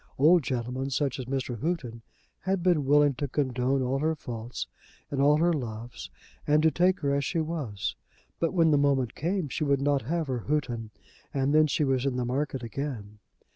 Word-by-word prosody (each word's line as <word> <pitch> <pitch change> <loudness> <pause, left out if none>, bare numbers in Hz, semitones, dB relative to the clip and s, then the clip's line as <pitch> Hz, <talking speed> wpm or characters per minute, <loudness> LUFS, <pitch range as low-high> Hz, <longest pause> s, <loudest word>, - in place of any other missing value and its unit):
Old 165 +5 +6
gentlemen, 130 +1 -3
such 135 -1 -1
as 125 - -5
was 135 0 -1
Mr. 120 -3 -6
Houghton, 130 -9 -2 0.4
had 190 -2 -1
been 170 -6 +3
willing 145 +1 +5
to 145 +3 -3
condone 130 -1 0
all 130 +2 0
her 160 +2 +1
faults, 120 -4 -6 0.5
and 140 -1 0
all 145 +1 +5
her 170 +2 +3
loves, 120 -4 -5 0.4
and 150 +1 +4
to 160 - +5
take 180 +2 +2
her 140 -2 +1
as 140 0 +1
she 170 - -2
was. 130 - -3 0.4
But 165 - +1
when 165 -3 +4
the 145 - +4
moment 135 -4 +2
came, 175 0 -1
she 145 - -3
would 140 -2 +2
not 140 0 +2
have 165 +7 -1
her 130 -3 -2
Houghton, 120 -5 -2 0.5
and 135 +1 +1
then 155 0 +5
she 150 - 0
was 135 -1 +1
in 130 - -1
the 125 -1 -1
market 135 +1 -2
again. 115 -4 -5
140 Hz, 200 wpm, -28 LUFS, 125-155 Hz, 0.5 s, Old